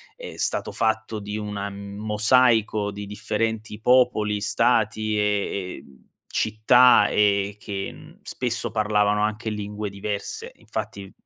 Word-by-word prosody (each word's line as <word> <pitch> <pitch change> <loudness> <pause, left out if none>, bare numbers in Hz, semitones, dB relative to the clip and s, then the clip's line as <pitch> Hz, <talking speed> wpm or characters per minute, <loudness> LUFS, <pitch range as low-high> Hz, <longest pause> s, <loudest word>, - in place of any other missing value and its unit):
è - - -9
stato - - -1
fatto 110 -1 -1
di 105 +1 -6
una 105 -1 -4
mosaico 105 +2 +1
di 100 0 -7
differenti 105 +1 -3
popoli, 115 -4 +3
stati 110 0 +1
e, 100 -2 -1
ehm, 65 -2 -20 0.2
città 115 +4 +5
e 100 -1 +2
che 100 -2 -5
n - - -15
spesso 120 -1 -3
parlavano 105 -1 +1
anche 110 +1 -2
lingue 105 0 -4
diverse, 100 +1 -5
infatti 100 - -6
i 95 - -11
105 Hz, 125 wpm, -24 LUFS, 100-110 Hz, 0.2 s, città